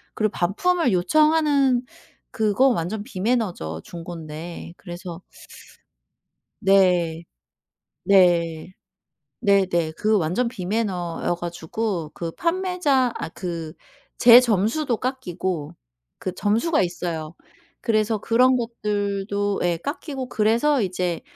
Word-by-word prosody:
그리고 215 -1 0
반품을 255 - +1
요청하는 285 - +3 0.5
그건 225 +4 +3
완전 200 +6 -3
비매너죠 185 - -2
중고인데. 165 0 -8
그래서 175 -1 -8 1.4
네. 180 -4 +3 0.8
네. 175 -3 +3 0.7
네네. 185 -5 +2
그 215 0 +2
완전 180 +9 0
비매너여 185 -5 -2
가지고 175 0 -3
그 165 -1 -5
판매자 335 - +1
아 - - -5
그 170 -3 -6 0.5
제 240 +1 +10
점수도 235 +4 +1
깎이고 185 - -3 0.5
그 185 - -4
점수가 225 - +1
있어요. 170 -2 -3 0.4
그래서 215 -1 +1
그런 250 +4 +3
것들도 205 -3 -2
예. 175 -1 +1
깎이고 275 - -5
그래서 235 +6 +2
이제 180 -3 -2
200 Hz, 215 characters per minute, -23 LUFS, 175-240 Hz, 1.4 s, 제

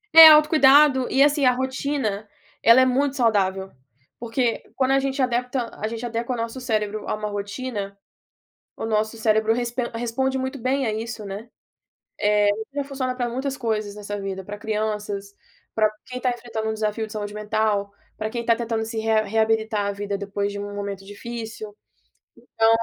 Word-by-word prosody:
É 325 0 +13
autocuidado, 300 -3 +6
e 270 - +5
assim 290 0 +3
a 255 - +6
rotina 260 -5 -2 0.3
ela 230 +2 +7
é - - +5
muito 270 +2 +1
saudável. 195 -6 +1 0.5
Porque 235 0 -1
quando 265 -1 +1
a 270 - +4
gente 270 0 -2
adepta 250 0 -1
a 215 - 0
gente 230 +2 -5
adequa 235 +1 -2
o - - -3
nosso 230 +3 -4
cérebro 215 -3 -2
a - - 0
uma 210 0 -4
rotina, 205 0 -5 0.8
o - - -5
nosso 220 +1 0
cérebro 220 0 +2
respan 240 +1 -2
responde 245 +3 -1
muito 260 +1 -3
bem 260 +2 0
a 220 - 0
isso, 225 -1 -5
né, 205 +4 -7 0.7
eh, 210 -1 +3 0.2
ainda 285 -1 -2
funciona 265 -2 -3
para 245 -1 -1
muitas 265 +3 -3
coisas 215 -5 -2
nessa 205 0 -5
vida, 190 -1 -5
para 205 +2 -7
crianças, 210 -2 -3 0.4
para 215 -1 +3
quem 250 0 -6
está 250 - 0
enfrentando 230 -2 -4
um 220 - -1
desafio 220 0 -2
de 215 - -12
saúde 205 -1 -4
mental, 210 -1 0 0.3
para 215 - -2
quem 235 +1 -4
está 230 0 +3
tentando 225 -1 -2
se 225 0 -5
rea 220 0 +2
reabilitar 220 0 +1
a 200 - -1
vida 200 0 -4
depois 200 0 -3
de 200 - -6
um 205 0 -6
momento 200 -1 -5
difícil, 220 0 -7 0.7
então 225 0 +1
225 Hz, 180 wpm, -23 LUFS, 210-255 Hz, 0.8 s, É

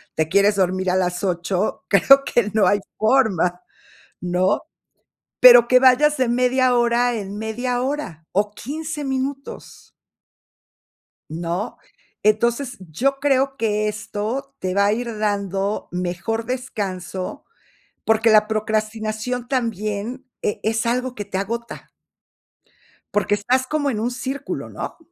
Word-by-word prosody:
te 160 -1 +1
quieres 200 +4 +3
dormir 185 0 0
a 185 - +1
las 180 0 -1
8, 180 +2 -1
creo 275 +7 +6
que 230 -6 +1
no 215 -3 +3
hay 205 +2 +3 0.2
forma, 205 -7 +2 0.6
¿no? 180 +3 +1 0.8
Pero 245 -1 +9
que 255 - +6
vayas 280 +4 +5
de 255 - +2
media 250 +1 +2
hora 240 0 +2
en 205 -2 -5
media 245 +3 -2
hora, 255 - -4
o 205 +2 +1
15 300 +5 -5
minutos. 270 +1 -5 1.4
¿No? 170 +6 -4 0.5
Entonces, 235 +4 +1
yo 270 - 0
creo 270 -1 +1
que 215 -3 0
esto 220 +6 -4
te 185 0 -2
va 200 0 +3
a 205 - +3
ir 235 0 -3
dando 200 -1 -1
mejor 180 +6 -3
descanso, 195 -8 -5 0.6
porque 220 +1 +3
la 215 0 +6
procrastinación 220 +2 -2
también 230 0 -2 0.2
e 210 - -2
es 225 +1 0
algo 250 +1 -1
que 205 - -5
te 195 -1 -5
agota. 230 +4 -5 1.2
Porque 205 0 +2
estás 255 +5 +2
como 290 0 0
en 215 -4 -2
un 235 +3 -1
círculo, 265 +3 -5
¿no? - - -6
220 Hz, 130 wpm, -21 LUFS, 200-255 Hz, 1.4 s, Pero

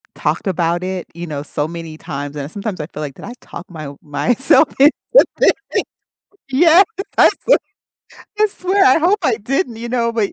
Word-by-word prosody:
Talked - - -2
about 175 -1 0
it, 185 -1 -4
you 170 +1 -7
know, 150 -4 -5
so 145 0 -3
many 165 -2 -8
times, 145 -3 -6
and 145 +1 -6
sometimes 200 -3 -5
I 150 - -6
feel 160 - -10
like, 145 -3 -6
"Did - - -13
I - - -7
talk 170 - -10
my 155 -3 -7
o 140 0 -10
myself 245 - +2
into 280 +3 +6 0.5
this?" - - +6 1.0
Yes! 330 +7 +6 0.3
I - - +7
sw - - +2 0.8
I 425 - +6
swear, 390 0 +1
I 260 +4 +5
hope 360 +6 +3
I 230 - +2
didn't, 245 - -2
you 235 +1 -6
know, 235 -1 0
but 220 -3 0
195 Hz, 190 wpm, -18 LUFS, -, 1.0 s, I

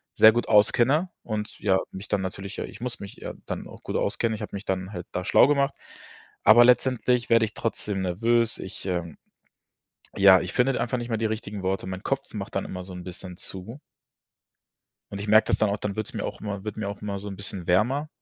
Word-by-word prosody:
sehr 110 - +8
gut 120 +2 -1
auskenne 125 - +4
und 105 -1 -5
ja, 95 -2 +3
mich 95 +2 -8
dann 105 -2 0
natürlich 95 +1 -6
ja - - -2
ich - - -12
muss 125 -1 -4
mich 100 - -9
ja - - -6
dann - - -5
auch - - -13
gut - - -5
auskennen. 115 -1 0
Ich - - -8
habe - - -6
mich 100 - -6
dann 95 0 -2
halt 90 -3 -6
da 90 - -3
schlau - - +6
gemacht, 140 -1 +2 0.7
aber 120 +2 +8
letztendlich 125 -1 +3
werde 115 -1 +5
ich 105 - -8
trotzdem 105 -3 -2
nervös. 115 +6 +1
Ich, 95 +1 -7
ähm, 85 -4 -3 1.0
ja 95 -2 +7
ich 95 - -5
finde 130 +1 +2
einfach 125 +1 -1
nicht 120 0 -5
mehr 115 - 0
die 115 - -2
richtigen 105 -2 -4
Worte. 95 0 -1
Mein 95 +1 -5
Kopf 135 -3 -3
macht 100 -1 -6
dann 95 - -1
immer 90 -1 -6
so 95 - -10
'n 90 0 -7
bisschen 90 0 -9
zu. 95 +8 -7 1.3
Und 100 - -5
ich 105 - -5
merke 110 +1 +6
das - - +2
dann 110 - +2
auch, 100 - -1
dann 100 -1 -4
wird 110 -1 -3
es - - -7
mir - - -3
auch - - -6
immer 100 -2 -5
wird 105 -1 -5
mir 100 -2 -3
auch 100 - -7
immer 100 -1 -3
so 105 - -8
'n 100 - -6
bisschen 100 -2 -7
wärmer. 125 +12 +2
105 Hz, 235 wpm, -26 LUFS, 95-115 Hz, 1.3 s, sehr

